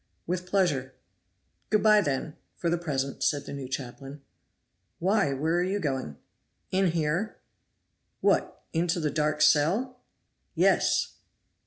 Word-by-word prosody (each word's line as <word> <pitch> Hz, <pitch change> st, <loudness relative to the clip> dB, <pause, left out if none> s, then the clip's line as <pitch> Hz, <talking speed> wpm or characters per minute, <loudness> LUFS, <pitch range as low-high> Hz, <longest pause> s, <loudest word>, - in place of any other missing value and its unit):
"With 180 Hz, +1 st, -3 dB
pleasure." 150 Hz, -9 st, 0 dB, 0.7 s
"Good 215 Hz, -2 st, +2 dB
by, 215 Hz, -1 st, +6 dB
then, 145 Hz, -2 st, -2 dB, 0.2 s
for 170 Hz, -, -1 dB
the 170 Hz, -, +2 dB
present," 140 Hz, -5 st, -3 dB
said 145 Hz, -2 st, +1 dB
the -, -, -7 dB
new 140 Hz, -2 st, -5 dB
chaplain. 135 Hz, +2 st, -7 dB, 0.7 s
"Why, 195 Hz, -3 st, +2 dB
where 155 Hz, +5 st, 0 dB
are -, -, +2 dB
you 195 Hz, +3 st, -1 dB
going?" 135 Hz, -, -3 dB, 0.5 s
"In 190 Hz, 0 st, +3 dB
here." 170 Hz, +5 st, -1 dB, 0.8 s
"What, -, -, +1 dB
into 170 Hz, +1 st, +1 dB
the 155 Hz, -2 st, 0 dB
dark 150 Hz, -1 st, 0 dB
cell?" 215 Hz, -, +2 dB, 0.5 s
"Yes!" -, -, +2 dB
160 Hz, 130 wpm, -28 LUFS, 140-185 Hz, 0.8 s, by